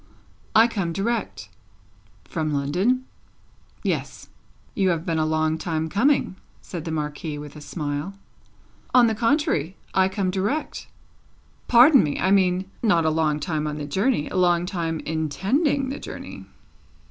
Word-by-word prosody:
"I 225 +1 +7
come 195 -7 -2
direct." 200 - -2 0.8
"From 155 -2 -2
London?" 180 - 0 0.8
"Yes." - - -3 0.4
"You 195 -3 +1
have 170 -1 -1
been 165 -3 0
a 155 - +1
long 155 0 0
time 160 -1 -2
coming," 230 - +2 0.2
said 170 -4 -7
the 165 - -3
Marquis, 150 0 -4
with 145 0 -9
a 150 - -10
smile. 150 +4 -4 0.8
"On 250 -1 +8
the 225 - +2
contrary; 225 - 0 0.2
I 190 0 +3
come 190 -1 -1
direct." 205 +12 -2 0.8
"Pardon 255 +3 +7
me! 145 -2 -2
I 190 - +2
mean, 185 -1 +3 0.2
not 170 -8 +3
a 160 - +3
long 155 -1 +1
time 155 0 -2
on 150 0 -4
the 150 - -4
journey; 190 - 0
a - - -7
long 175 -1 +3
time 165 -4 -3
intending 205 - 0
the 275 - -5
journey." - - -8
175 Hz, 145 wpm, -24 LUFS, 155-215 Hz, 0.8 s, On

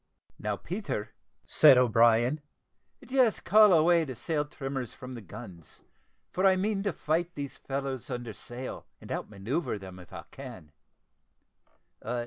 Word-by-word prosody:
"Now, 105 0 -1
Peter," 145 - -4 0.3
said 145 -4 +7
O'Brien, 120 +3 +4 0.6
"just 255 -4 +2
call 215 -1 +7
away 170 0 +5
the 130 -5 -6
sail 150 +5 -1
trimmers 135 -4 -5
from 130 0 -9
the 120 - -7
guns, 95 -5 -11 0.5
for 185 - -1
I 190 -1 +6
mean 200 +1 0
to 200 0 0
fight 165 +2 -1
these 140 -2 -6
fellows 135 -2 -4
under 120 -3 -4
sail, 120 +6 -8
and - - -11
out - - -3
manoeuvre 110 - -2
them, 95 -2 -10
if 90 - -14
I - - -8
can. 120 - -10
135 Hz, 140 wpm, -29 LUFS, 115-170 Hz, 0.6 s, said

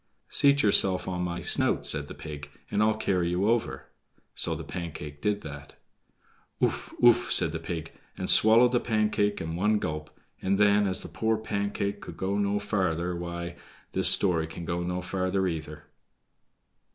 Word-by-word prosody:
"Seat 140 0 +4
yourself 95 -3 +3
on 90 -1 -3
my 85 -1 -3
snout," - - +2
said 75 -2 +3
the - - -9
pig, 75 -2 -8 0.2
"and 105 - +1
I'll 110 0 +2
carry 90 -5 0
you 90 +4 0
over." 110 - -1 0.5
So - - +2
the - - -7
Pancake 75 -4 -7
did 105 -1 0
that. 70 -1 -10 0.8
"Ouf, - - -1
ouf," 120 0 +5
said 80 - +4
the 80 - -4
pig, 80 -1 -6 0.3
and - - -4
swallowed 115 +3 +6
the 125 - +2
Pancake 105 -2 0
at 80 - -5
one 100 +7 +1
gulp; 75 -5 -4 0.3
and 95 +1 +1
then, 105 0 +4
as 95 - +1
the - - -8
poor 110 0 -1
Pancake 100 -1 -3
could - - -10
go 100 +2 -1
no 100 0 0
farther, 90 -4 -1
why—this 85 0 -2
story 85 -5 +3
can 85 +1 -8
go 85 +1 -2
no 90 +1 -3
farther 95 +1 -1
either. 75 -3 -6
95 Hz, 165 wpm, -27 LUFS, 85-105 Hz, 0.8 s, swallowed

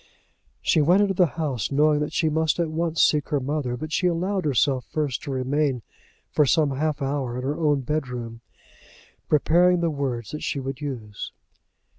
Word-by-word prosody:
She 155 - +3
went 180 +7 +4
into 195 -1 +1
the 180 -1 +4
house 140 - -2
knowing 150 +1 +3
that 150 - -2
she 160 - +1
must 160 0 +1
at 165 -2 0
once 165 0 +1
seek 150 -2 +2
her 145 -3 +1
mother; 135 -2 -2
but 155 +4 -6
she 180 - +1
allowed 185 +2 -1
herself 135 -2 +2
first 145 -5 -2
to 145 - -6
remain 130 -1 0 0.5
for 150 - +4
some 150 +1 +3
half 150 +1 -1
hour 135 -3 -2
in 125 - -4
her 145 +4 -2
own 150 -3 +2
bedroom, 125 -5 -4 0.9
preparing 175 +4 +4
the 170 -1 +1
words 130 -6 -3
that 150 - -5
she 140 - -2
would 135 +1 -5
use. 115 -8 -6
150 Hz, 180 wpm, -24 LUFS, 130-160 Hz, 0.9 s, went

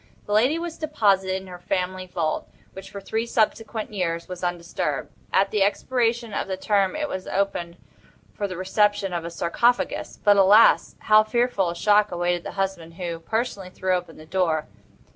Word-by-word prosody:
The 205 - -3
lady 250 +9 +3
was 335 -1 -5
deposited 200 -11 +2
in 190 - -12
her 180 -1 -10
family 185 0 -2
vault, 165 -3 -2 0.2
which, 190 0 -10
for 200 - -7
three 220 +4 -3
subsequent 220 -1 -1
years, 170 -4 -2
was 180 0 -8
undisturbed. 170 -5 -2 0.2
At 195 +1 +3
the 210 - 0
expiration 235 +2 0
of - - -2
this 190 -1 -5
term 200 0 +2
it 305 -1 -2
was 185 -8 -5
opened 180 -3 -2 0.6
for 205 - -3
the 185 -3 -6
reception 205 0 +1
of 170 -1 -3
a - - -3
sarcophagus; 235 +9 0
but, 205 -1 +5
alas! 200 +4 +6
how 215 0 +6
fearful 225 -4 +1
a 170 - -4
shock 210 +2 +3
awaited 175 0 -1
the - - -7
husband, 190 -4 -3
who, 170 -2 -4
personally, 205 0 -3
threw 185 0 -1
open 175 -2 -3
the 155 - -12
door! 160 -3 0
195 Hz, 180 wpm, -24 LUFS, 175-215 Hz, 0.6 s, alas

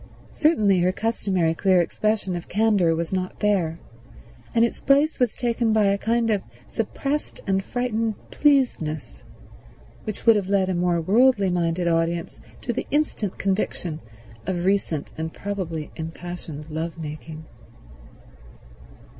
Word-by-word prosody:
Certainly 215 - +3
her 180 +1 +3
customary 190 -6 0
clear 185 +2 +3
expression 205 +1 0
of 175 - -6
candor 200 -5 +3
was 170 +2 -3
not 185 -1 -2
there, 185 -6 +1 0.8
and 230 0 +6
its 235 - -4
place 285 +3 +3
was 250 -3 +2
taken 235 -2 +1
by 215 -1 +4
a 200 0 +3
kind 230 +1 +1
of 205 -2 +1 0.3
suppressed 275 +6 -3
and 195 -1 +1
frightened 230 -2 -1 0.2
pleasedness, 250 - +1 0.8
which 215 - -5
would 230 -1 +7
have 195 -2 -1
led 195 -2 +2
a - - +1
more 175 -1 +1
worldly 200 +2 +4
minded 175 0 0
audience 165 0 0 0.2
to 240 - -2
the - - -3
instant 290 -10 0
conviction 190 -5 -2 0.5
of 180 -2 -1
recent 190 -6 0
and 160 0 -3
probably 180 -6 -4
impassioned 165 -2 -7
lovemaking. 160 -1 -5
190 Hz, 130 wpm, -24 LUFS, 170-225 Hz, 0.8 s, would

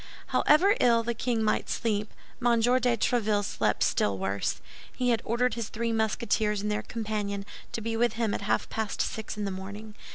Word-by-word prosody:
However 365 +7 +4
ill 235 -1 +4
the 235 +1 -1
king 230 -1 -1
might 215 - 0
sleep, 210 -2 -1 0.3
M. 240 -1 +4
de 245 +1 +3
Tréville 210 -3 +1
slept - - 0
still 100 -1 +1
worse. 95 +1 -1 0.3
He 250 -1 -1
had 230 -2 +2
ordered 245 +2 +1
his 230 -2 -4
three 230 +1 -2
Musketeers 220 -1 +1
and 210 - -1
their 210 - 0
companion 210 -3 -3 0.3
to 230 - -3
be 225 +1 -2
with 235 0 +2
him 225 -2 0
at - - -2
half 200 - 0
past 220 -2 -3
six 220 -1 -5
in 210 - -2
the 200 - -2
morning. 200 +3 -7
220 Hz, 190 wpm, -28 LUFS, 210-235 Hz, 0.3 s, However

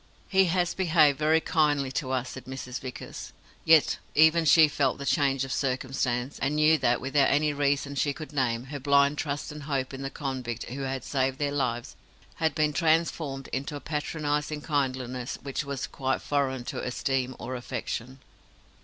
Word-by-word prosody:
He 190 0 +4
has 175 0 +1
behaved 155 -6 +3
very 155 +1 +4
kindly 145 -5 +1
to 135 -1 -3
us," 130 -1 -1
said 130 - -9
Mrs. 130 -1 -6
Vickers. 130 -1 -8 0.3
Yet 160 -2 +5 0.2
even 160 +2 +5
she 155 +1 +7
felt 140 -3 0
the 140 - -6
change 135 -2 +2
of 135 - -4
circumstance, 130 -1 -1
and 140 +2 0
knew 155 +1 +4
that, 120 - +2
without 135 +1 +2
any 150 +1 +2
reason 140 0 0
she 140 +1 +1
could 155 +2 -8
name, 120 -4 0
her 145 - -3
blind 140 +1 +3
trust 145 -1 -3
and 150 0 -8
hope 140 -2 -2
in 135 - -6
the 135 - -3
convict 130 -5 -4
who 130 +4 -6
had 135 -1 -3
saved 130 -1 0
their 145 -1 -1
lives 120 -4 -2 0.4
had 160 -1 0
been 150 -1 +1
transformed 155 -3 0
into 140 +3 -3
a - - -5
patronizing 150 0 -2
kindliness 130 -4 -2
which 140 +1 -3
was 140 -2 -4
quite 135 -1 -2
foreign 135 -3 0
to - - -4
esteem 130 +1 -1
or 130 +2 -5
affection. 125 +1 -5
140 Hz, 175 wpm, -27 LUFS, 130-150 Hz, 0.4 s, she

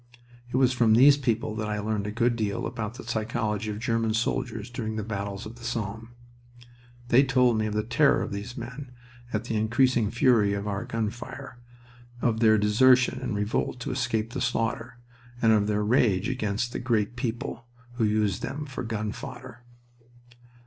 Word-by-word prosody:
It - - -3
was 130 -1 +4
from 115 -3 +4
these 140 +4 +8
people 115 -5 -1
that 105 -1 -2
I 105 - -1
learned 105 -1 -2
a - - -3
good 115 +2 +1
deal 105 -4 -2
about 115 -2 -4
the - - -9
psychology 110 -2 -2
of 105 - -4
German 115 -1 0
soldiers 115 0 -2
during 110 -3 -4
the 110 - -3
battles 100 -2 -4
of 110 +2 -9
the 120 - -14
Somme. 115 -2 -4 1.0
They 130 +3 +6
told 125 -4 +3
me 110 - 0
of 105 - -3
the 105 - +1
terror 120 +6 +3
of - - -5
these 100 +4 -6
men 125 +3 -7 0.4
at 110 0 -1
the 115 -1 -3
increasing 115 +1 +2
fury 115 -4 +3
of 100 +1 -4
our 100 -1 -3
gun 110 -2 -2
fire, 130 +2 -9 0.6
of 115 -2 +1
their 110 -1 +5
desertion 125 +5 +4
and 110 - -3
revolt 105 +4 -1
to 140 - -3
escape 120 -3 -1
the 130 - -3
slaughter, 115 0 -2 0.4
and 115 -2 +4
of 105 -1 +2
their 105 0 0
rage 105 -3 +2
against 120 -2 -2
the - - -3
"Great 115 -3 0
People" 120 0 -4 0.3
who 115 - +1
used 105 -3 +1
them 145 +2 -4
for 135 -2 -6
gun 110 -3 -3
fodder. 125 -1 -9
115 Hz, 185 wpm, -27 LUFS, 105-125 Hz, 1.0 s, these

